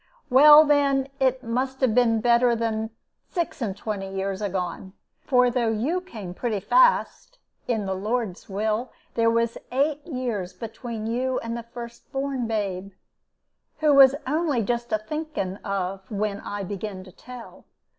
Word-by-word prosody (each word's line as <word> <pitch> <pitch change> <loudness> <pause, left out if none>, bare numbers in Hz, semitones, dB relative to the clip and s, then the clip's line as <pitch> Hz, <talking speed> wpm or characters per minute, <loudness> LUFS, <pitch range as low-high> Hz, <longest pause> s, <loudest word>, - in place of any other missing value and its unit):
Well, 295 +4 +9
then, 280 -2 +2
it 260 -1 +1
must 260 +3 -2
have 255 -4 +3
been 230 -2 +3
better 240 +1 +4
than 220 -1 -2 0.4
six 340 -6 -3
and 200 -4 -2
twenty 205 -2 -4
year 195 0 -2
agone; 190 -1 -4 0.3
for 250 -2 +3
though 235 -2 +1
you 260 +12 0
came 215 - -8
pretty 215 +1 -2
fast, - - +2 0.3
in 220 -4 0
the 190 - -1
Lord's 210 0 -3
will, 215 +5 -1 0.2
there 230 -1 +3
was 230 0 0
eight 285 +3 0
years 235 - -3
between 225 +2 -6
you 250 +3 -1
and 230 0 -4
the 235 - -4
first 235 0 -10
born 270 -3 -2
babe, 195 -3 -3 0.8
who 305 -1 +3
was 275 -1 +8
only 295 -3 0
just 240 +2 -2
a 215 - +3
thinking 215 -5 -4
of 195 -1 -4
when 205 -1 -2
I 205 -1 -5
begin 195 0 -5
to 185 - -14
tell. 250 +4 -12
230 Hz, 155 wpm, -25 LUFS, 205-260 Hz, 0.8 s, Well